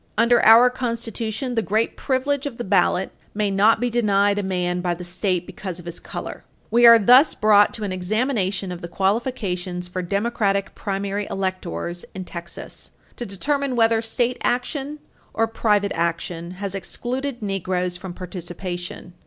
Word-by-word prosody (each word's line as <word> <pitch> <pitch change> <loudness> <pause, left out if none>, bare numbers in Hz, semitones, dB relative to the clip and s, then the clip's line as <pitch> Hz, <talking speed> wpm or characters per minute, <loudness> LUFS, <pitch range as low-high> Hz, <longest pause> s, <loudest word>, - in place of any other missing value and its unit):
Under 235 +1 +4
our 235 +3 +8
Constitution, 235 0 -3
the 225 - +1
great 215 +2 0
privilege 280 +1 -1
of 250 -5 -7
the 240 - -3
ballot 190 -1 +2 0.2
may 205 -1 0
not 210 +3 +4
be 245 - 0
denied 205 -3 +2
a - - 0
man 180 -2 -1
by 175 -1 -1
the 180 - -8
State 180 0 -1
because 185 -3 -7
of 175 - -10
his 170 0 -6
color. - - -7 0.3
We 235 +1 +7
are 230 0 +10
thus 250 +7 +6
brought 210 -1 +5
to 220 - -6
an 195 -2 -2
examination 195 -1 -1
of 175 - -7
the 170 - -5
qualifications 190 -3 -1
for 185 +1 -4
Democratic 200 +1 0
primary 200 0 -3
electors 180 - -3
in 185 -1 -5
Texas, 170 -1 -8 0.3
to 240 - -5
determine 275 +7 -1
whether 225 -1 +3
state 240 +2 -1
action 275 +4 -1 0.4
or 225 - +3
private 210 -3 +1
action 170 0 -2
has 200 -1 -4
excluded 245 +5 -4
Negroes 185 -2 -1
from 180 0 -8
participation. 175 0 -7
200 Hz, 160 wpm, -22 LUFS, 180-235 Hz, 0.4 s, are